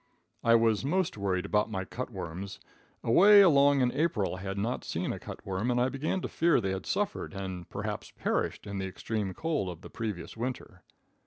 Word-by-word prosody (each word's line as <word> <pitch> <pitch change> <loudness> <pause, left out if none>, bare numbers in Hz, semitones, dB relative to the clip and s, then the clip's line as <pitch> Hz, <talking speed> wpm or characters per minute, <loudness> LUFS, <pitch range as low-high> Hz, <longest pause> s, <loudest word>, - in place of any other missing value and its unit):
I 115 0 +6
was 115 -1 +3
most 180 +6 0
worried 95 -2 -1
about 105 +2 +1
my 95 -3 -3
cut 125 +6 -5
worms. 95 -2 -6 0.4
Away 200 - +8
along 140 -6 +5
in 125 -1 +3
April 125 - 0
I - - -9
had 95 0 -4
not 115 +5 -2
seen - - -2
a - - -6
cutworm, 100 +5 -4
and 120 0 +2
I 125 +1 +3
began 150 +7 -2
to - - -3
fear 165 -3 +3
they 95 -4 -1
had 95 0 -4
suffered, 205 - -2
and 95 -3 -5
perhaps - - -4
perished, - - -2
in 100 -1 -4
the 95 - -2
extreme 100 0 -3
cold 155 - -1
of 85 -1 -8
the - - -11
previous 105 -7 -5
winter. 125 +3 -5
110 Hz, 195 wpm, -30 LUFS, 95-140 Hz, 0.4 s, Away